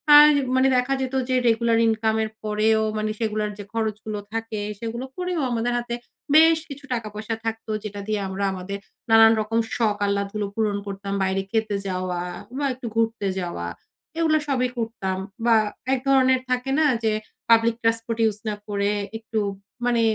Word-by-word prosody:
আর 295 0 +11 0.3
মানে 260 +1 +4
দেখা 250 +2 +2
যেত 260 0 -3 0.2
যে, 255 - +2
রেগুলার 230 0 +3
ইনকামের 220 0 +1
পরেও 215 +1 +2 0.2
মানে 215 0 -1
সেগুলোর 215 -2 -1
যে - - -5
খরচগুলো 215 -1 -2
থাকে, 225 -2 -3 0.2
সেগুলো 235 +3 -4
করেও 360 -2 -2
আমাদের 240 +1 0
হাতে 240 0 -3 0.4
বেশ 325 +1 +7
কিছু 285 +1 -9
টাকা-পয়সা 215 -1 -3
থাকতো। 225 0 -3
যেটা 205 -1 -6
দিয়ে 215 -1 0
আমরা 190 +1 -3
আমাদের 190 +2 -5 0.3
নানান 225 0 +8
রকম 225 +2 0 0.2
শখ 220 -4 +1
আহ্লাদগুলো 200 +1 -1
পূরণ 210 -2 +1
করতাম। 195 0 -4
বাইরে 190 0 +1
খেতে 220 -2 0
যাওয়া 185 -1 -2 0.4
বা, 285 - 0
একটু 250 -1 -7
ঘুরতে 225 -3 +1
যাওয়া। 170 - -4 0.5
এগুলো 315 -2 +4
সবই 255 -3 +1
করতাম 220 -5 -2 0.3
বা, 235 -1 +6 0.4
এক 260 - +1
ধরনের 260 -1 +4
থাকে 250 +1 0
না? 315 - +4 0.2
যে 220 - +3 0.4
পাবলিক 230 0 +5
ট্রান্সপোর্ট 230 0 0
ইউজ 215 -2 +2
না 210 - -2
করে 200 0 0 0.3
একটু 225 0 -3 0.5
মানে 240 -1 +3
225 Hz, 160 wpm, -24 LUFS, 210-240 Hz, 0.5 s, আর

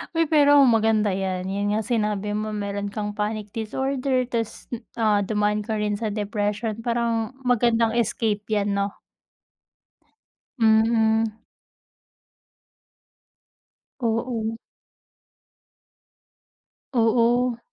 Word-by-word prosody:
Uy, 330 - +4
pero 290 -2 +6
maganda 220 -3 +3
yan, 185 -1 -2
yun 205 +1 -1
nga 220 - 0
sinabi 210 -3 -1
mo 215 0 -3
meron 200 0 -3
kang 210 0 -4
panic 210 0 -3
disorder, 260 +4 -1
tapos, 230 -3 -4 0.3
ah, 215 -3 +2
dumaan 210 +1 0
ka 220 +1 -3
rin 210 -1 -1
sa 225 - -2
depression, 210 +1 -2
parang 235 0 -1
magandang 235 -2 +2
escape 220 -2 0
yan, 205 -2 0
'no? 200 0 -1 1.7
Mm. 220 0 +3 2.7
Oo. 225 -1 -1 2.4
Oo. 240 +1 +2
220 Hz, 90 wpm, -24 LUFS, 210-235 Hz, 2.7 s, pero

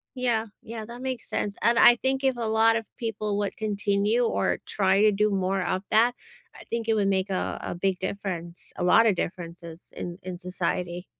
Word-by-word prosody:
Yeah, 235 -3 +1 0.2
yeah, 225 -1 -7
that 240 +2 -9
makes 260 -3 -4
sense, 200 -1 -2
and 235 0 +4
I 240 - +8
think 265 +2 0
if 265 -2 +2
a 230 - -2
lot 220 +1 +4
of 225 -1 -2
people 215 -3 -2
would 200 -1 -2
continue 205 +2 +1
or 230 - 0
try 195 0 +2
to 215 - +5
do 210 +1 +1
more 190 0 0
of 185 +1 -1
that, 230 +3 +4 0.4
I - - -11
think 230 -1 -3
it 225 - +3
would 205 -2 +1
make 190 0 0
a 185 - -2
a - - -4
big 185 +1 -1
difference, 180 -3 -4
a - - -3
lot 225 +6 +6
of 200 - +3
differences 170 -1 -6 0.2
in 175 +1 -6
in 180 -1 -6
society. 180 0 -3
205 Hz, 205 wpm, -26 LUFS, 185-225 Hz, 0.4 s, I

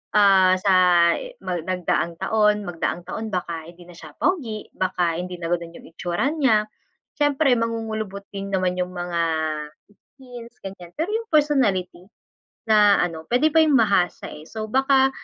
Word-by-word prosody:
ah, 190 -2 +5
sa 195 -1 +2 0.5
i - - -9
mag 175 -3 -3
nagdaang 175 -2 -1
taon, 210 0 +2
magdaang 175 -1 -3
taon 220 +4 -5
baka 170 -3 -4
hindi 175 +1 -14
na 175 - -13
siya 155 -3 -13
pogi, 245 - -2
baka 175 -3 -1
hindi 180 0 -5
na 170 0 -4
ganun 170 -1 -3
yung - - -14
itsura 175 - -2
niya. 245 -9 +2 0.5
Siyempre, 290 -2 +3
mangungulubot 220 -3 -4
din 195 0 -6
naman 185 -1 0
yung 180 0 -3
mga 175 -1 -2 1.0
skins, 245 -3 -12
ganyan. 180 -3 -9
Pero 325 - -1
yung 455 0 -3
personlity 205 - +1 0.6
na 210 -2 +5
ano 165 -2 -3
puwede 260 +6 +3
pa 320 - +6
yung 295 -3 +3
mahasa, 200 -5 +1
eh. 150 - -10
So, 220 -1 -5
baka 270 +1 +3
200 Hz, 160 wpm, -23 LUFS, 175-245 Hz, 1.0 s, pa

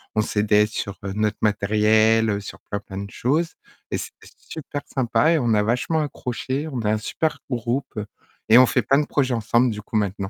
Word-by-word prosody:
on 110 - +3
s'aidait 105 0 +2
sur 100 -2 -5 0.2
notre 105 0 0
matériel, 110 +1 +3
heu, 100 -1 0
sur 100 - -9
plein, 100 - -2
plein 95 -2 -8
de 100 0 -6
choses 155 +7 0 0.3
et - - -1
c'était - - -9
super 145 -2 -7
sympa 135 +4 +1
et 165 - +3
on 120 -4 +1
a 105 - +3
vachement 125 +8 0
accroché, 135 +1 -4
on 130 - -3
a 105 - +1
un 110 - +2
super 155 +8 -2
groupe 120 -1 -2 0.5
et 110 - +8
on 130 - +8
fait 125 - +2
plein 140 +6 +3
de 150 - 0
projets 135 -3 0
ensemble 115 +2 +2
du 105 -1 -6
coup 105 - -9
maintenant. 100 -2 -1
110 Hz, 205 wpm, -23 LUFS, 105-130 Hz, 0.5 s, et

